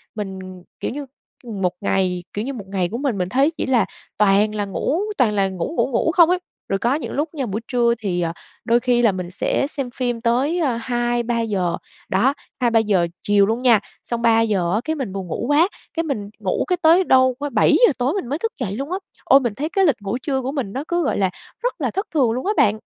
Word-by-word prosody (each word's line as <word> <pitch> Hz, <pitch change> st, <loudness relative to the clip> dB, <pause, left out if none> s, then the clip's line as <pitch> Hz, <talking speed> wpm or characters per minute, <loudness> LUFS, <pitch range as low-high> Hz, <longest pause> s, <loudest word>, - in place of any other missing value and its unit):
mình, 195 Hz, -3 st, -5 dB, 0.4 s
kiểu -, -, -3 dB
như, 285 Hz, +2 st, -5 dB, 0.4 s
ừm, 215 Hz, -5 st, -6 dB
một 180 Hz, -1 st, +1 dB
ngày, 185 Hz, -3 st, 0 dB
kiểu 210 Hz, +3 st, -3 dB
như, 275 Hz, -, -3 dB
một 210 Hz, -6 st, -7 dB
ngày 185 Hz, -3 st, -1 dB
của 230 Hz, -, -4 dB
mình 265 Hz, -6 st, -1 dB
mình 180 Hz, 0 st, -1 dB
thấy 275 Hz, -, +3 dB
chỉ 320 Hz, -, -4 dB
là 245 Hz, -7 st, +3 dB, 0.3 s
toàn 210 Hz, +1 st, +3 dB
là 205 Hz, -1 st, -1 dB
ngủ 285 Hz, -, -1 dB, 0.2 s
toàn 225 Hz, -5 st, +3 dB
là 195 Hz, -1 st, +2 dB
ngủ 185 Hz, -, -4 dB
ngủ -, -, +3 dB
ngủ 320 Hz, +7 st, +2 dB
không 340 Hz, -1 st, +6 dB
ấy?" 360 Hz, 0 st, +2 dB, 0.3 s
Rồi 195 Hz, -, 0 dB
có 240 Hz, +6 st, +1 dB
những 310 Hz, -, -4 dB
lúc 300 Hz, +2 st, -1 dB
nha, 275 Hz, -4 st, -2 dB
buổi 215 Hz, +1 st, -3 dB
trưa 240 Hz, -2 st, +2 dB
thì, 180 Hz, -5 st, -1 dB
ờ, 165 Hz, -1 st, -1 dB, 0.3 s
đôi 235 Hz, 0 st, +4 dB
khi 245 Hz, -1 st, +2 dB
là 225 Hz, -4 st, +4 dB
mình 180 Hz, -2 st, -5 dB
sẽ 200 Hz, +8 st, 0 dB
xem 275 Hz, -4 st, -3 dB
phim 245 Hz, -3 st, -2 dB
tới, 260 Hz, +9 st, +1 dB
a, 260 Hz, -8 st, +1 dB
2-3 240 Hz, -1 st, -1 dB
giờ, 185 Hz, -6 st, -1 dB, 0.3 s
đó, 240 Hz, +9 st, +3 dB, 0.3 s
2-3 235 Hz, -2 st, +3 dB
giờ 195 Hz, -6 st, +2 dB, 0.2 s
chiều 205 Hz, -1 st, +4 dB
luôn 225 Hz, +4 st, -1 dB
nha, 235 Hz, -5 st, +5 dB, 0.2 s
xong 235 Hz, -1 st, -3 dB
3 225 Hz, -1 st, +4 dB
giờ 190 Hz, -5 st, +1 dB
á, 215 Hz, -, +1 dB
cái, 315 Hz, 0 st, -1 dB
mình 245 Hz, -10 st, -4 dB
buồn 190 Hz, -2 st, -5 dB
ngủ 200 Hz, -, -3 dB
quá, 310 Hz, +5 st, +5 dB, 0.3 s
cái, 330 Hz, 0 st, -1 dB
mình 215 Hz, -10 st, -3 dB
ngủ, -, -, -1 dB
cái, 360 Hz, -1 st, +1 dB
tới 335 Hz, +3 st, +6 dB
đâu, 260 Hz, -5 st, +4 dB
ơ, 290 Hz, 0 st, -2 dB
7 -, -, +3 dB, 0.2 s
giờ -, -, +3 dB
tối 260 Hz, +3 st, +1 dB
mình 390 Hz, -12 st, -3 dB
mới 290 Hz, +5 st, -2 dB
thức 455 Hz, +3 st, -1 dB
dậy 200 Hz, -5 st, -2 dB
luôn 275 Hz, +8 st, -5 dB
á. 370 Hz, -, 0 dB, 0.3 s
Ôi, 270 Hz, -, +7 dB
mình 240 Hz, -5 st, -2 dB
thấy 305 Hz, +3 st, -3 dB
cái 385 Hz, +1 st, +2 dB
lịch 255 Hz, -9 st, +2 dB
ngủ 205 Hz, +4 st, -2 dB
trưa 265 Hz, -3 st, -1 dB
của 260 Hz, +2 st, -3 dB
mình 250 Hz, -9 st, -3 dB
nó 270 Hz, +3 st, -3 dB
cứ, 345 Hz, 0 st, 0 dB
gọi 285 Hz, -, 0 dB
là, 190 Hz, -2 st, +2 dB, 0.3 s
rất -, -, -2 dB
là -, -, 0 dB
thất 390 Hz, +3 st, -3 dB
thường 255 Hz, -7 st, +3 dB
luôn 255 Hz, +7 st, -3 dB
á 415 Hz, -, +2 dB
bạn. 215 Hz, +1 st, +3 dB
240 Hz, 255 wpm, -21 LUFS, 200-280 Hz, 0.4 s, Ôi